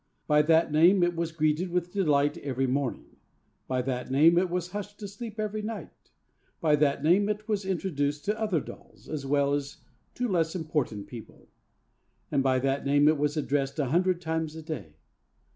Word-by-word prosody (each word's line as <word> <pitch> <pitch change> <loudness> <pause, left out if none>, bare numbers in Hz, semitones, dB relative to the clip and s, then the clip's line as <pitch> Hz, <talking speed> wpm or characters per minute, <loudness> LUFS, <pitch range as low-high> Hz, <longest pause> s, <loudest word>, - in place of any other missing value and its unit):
By 150 -1 +4
that 160 +1 +3
name 175 +5 +5
it 175 0 +1
was 165 -1 -2
greeted 155 +2 0
with 175 0 -1
delight 150 -7 +2
every 135 -1 -1
morning; 130 0 -3 0.5
by 130 -1 -1
that 125 -1 -3
name 155 +6 +5
it 185 0 0
was 180 0 -3
hushed 205 +1 -6
to 205 - -6
sleep 220 +2 -8
every 215 0 -2
night; 215 0 -8 0.5
by 155 -2 +3
that 145 -1 +1
name 190 +6 +4
it 210 0 -3
was 205 -3 -1
introduced 150 -6 -2
to 215 +2 -1
other 195 -8 +1
dolls, - - -13
as 145 -3 -5
well 140 0 +2
as 145 0 -3 0.4
to 245 - -1
less 170 -4 0
important 150 - -2
people; 115 -3 -12 0.8
and 135 - +2
by 130 -1 +2
that 135 +2 0
name 145 +1 +4
it 155 -1 +3
was 150 +1 0
addressed 140 -2 -1
a 140 -5 0
hundred 180 0 +2
times 160 -2 -2
a 160 - -8
day. 150 - -7
160 Hz, 185 wpm, -28 LUFS, 140-185 Hz, 0.8 s, name